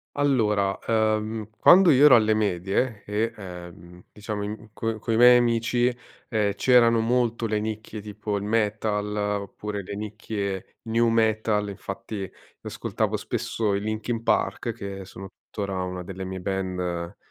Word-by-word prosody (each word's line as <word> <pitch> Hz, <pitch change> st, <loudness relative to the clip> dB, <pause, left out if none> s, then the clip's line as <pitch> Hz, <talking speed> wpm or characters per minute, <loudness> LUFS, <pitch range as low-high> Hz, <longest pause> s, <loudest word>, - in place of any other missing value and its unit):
Allora, 105 Hz, -9 st, +2 dB
uhm, 110 Hz, -1 st, 0 dB
quando 185 Hz, -1 st, +7 dB
io 140 Hz, +1 st, +6 dB
ero 150 Hz, -, +9 dB
alle 110 Hz, -1 st, +4 dB
medie, 105 Hz, +2 st, -1 dB
e, 105 Hz, +2 st, -1 dB
ehm, 90 Hz, -2 st, -10 dB
diciamo 105 Hz, 0 st, -5 dB
in 110 Hz, +1 st, -7 dB
coi 115 Hz, 0 st, -2 dB
coi 115 Hz, 0 st, -1 dB
miei 125 Hz, +1 st, +8 dB
amici, 120 Hz, +1 st, +1 dB, 0.3 s
ehm, 105 Hz, -4 st, +1 dB
c'erano 120 Hz, -2 st, +5 dB
molto 120 Hz, 0 st, +1 dB
le 110 Hz, -1 st, 0 dB
nicchie 110 Hz, 0 st, -5 dB
tipo: 105 Hz, 0 st, -4 dB
il 100 Hz, -, -4 dB
metal 105 Hz, -1 st, 0 dB
,oppure 105 Hz, 0 st, -3 dB
le 100 Hz, -, -6 dB
nicchie 105 Hz, -2 st, -5 dB
new 115 Hz, +1 st, +2 dB
metal 110 Hz, -2 st, +1 dB
infatti, 100 Hz, 0 st, -6 dB, 0.3 s
ascoltavo -, -, -2 dB
spesso 105 Hz, -3 st, -2 dB
i -, -, 0 dB
Linkin 110 Hz, +2 st, -3 dB
Park, 115 Hz, 0 st, 0 dB
che 100 Hz, -3 st, -7 dB
sono 95 Hz, +1 st, -10 dB
tuttora 100 Hz, -3 st, -5 dB
una 90 Hz, 0 st, -4 dB
delle 95 Hz, +1 st, -7 dB
mie 95 Hz, 0 st, -5 dB
band 90 Hz, -3 st, -3 dB
105 Hz, 140 wpm, -25 LUFS, 100-115 Hz, 0.3 s, ero